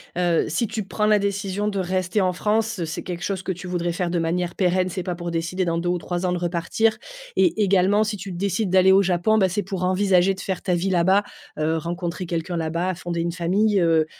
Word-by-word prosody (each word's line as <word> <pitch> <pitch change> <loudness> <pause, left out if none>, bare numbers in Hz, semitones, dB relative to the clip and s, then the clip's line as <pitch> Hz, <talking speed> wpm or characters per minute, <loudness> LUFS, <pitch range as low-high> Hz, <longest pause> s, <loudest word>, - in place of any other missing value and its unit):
heu, 175 -2 +2
si 225 +9 -1
tu 220 0 -3
prends 210 +2 -1
la 215 0 +5
décision 200 0 -2
de 200 -2 -1
rester 185 +2 0
en 185 -1 +1
France, 210 0 0
c'est 160 - -5
quelque 175 -1 -6
chose 195 -2 -2
que 190 - -3
tu 185 +1 -7
voudrais 175 -1 -1
faire 175 -1 -2
de 175 - 0
manière 170 +1 -1
pérenne, 185 0 +1
c'est 185 - -4
pas 180 0 -3
pour 170 0 -5
décider 170 +3 -1
dans 165 -1 0
2 175 +1 -1
ou 180 - +1
3 175 +1 -3
ans - - 0
de 180 - 0
repartir 175 +6 0 0.4
et 220 -11 +3
également, 195 +2 +3
si 215 0 -2
tu 195 0 -7
décides 195 +3 -1
d'aller 185 +1 +5
au 195 +1 +6
Japon, 190 +4 +2
ben, 190 -2 +3
c'est 200 +3 -1
pour 190 -1 -4
envisager 185 0 +3
de - - -12
faire 190 -2 -3
ta 180 -2 0
vie 185 +3 -1
là-bas, 190 +3 +3 0.4
heu, 160 +1 +1
rencontrer 175 +2 -4
quelqu'un 170 +1 -3
là-bas, 170 +3 -1
fonder 170 0 -3
une 170 0 -1
famille, 195 +5 +1
heu 165 -2 +3
180 Hz, 235 wpm, -23 LUFS, 175-195 Hz, 0.4 s, au